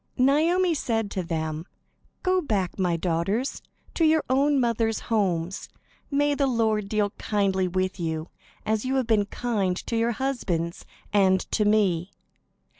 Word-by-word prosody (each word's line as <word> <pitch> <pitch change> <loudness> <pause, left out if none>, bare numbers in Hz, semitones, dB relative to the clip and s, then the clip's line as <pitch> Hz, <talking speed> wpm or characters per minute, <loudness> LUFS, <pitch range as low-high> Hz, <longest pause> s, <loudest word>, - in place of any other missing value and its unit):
Naomi 325 +7 +3
said 225 -8 -1
to 190 - -2
them: 160 -2 -3 0.6
"Go 370 0 +2
back, 200 - -2
my 175 -3 +1
daughters, 185 - -1 0.3
to 330 - 0
your 315 -1 +4
own 280 +2 +3
mothers' 230 -2 +1
homes. 185 -3 0 0.4
May 290 0 +2
the 280 -1 +1
Lord 220 -4 +1
deal 210 -1 +1
kindly 195 -3 +1
with 185 +1 -2
you, 160 -1 -3 0.4
as 215 0 0
you 260 +1 -1
have 260 -2 +1
been 215 -3 +2
kind 200 -6 -1
to 230 - -2
your 230 +1 +1
husbands 195 -11 -2 0.3
and 190 -2 +4
to 210 - +2
me. 195 -5 +2
215 Hz, 145 wpm, -25 LUFS, 185-260 Hz, 0.6 s, your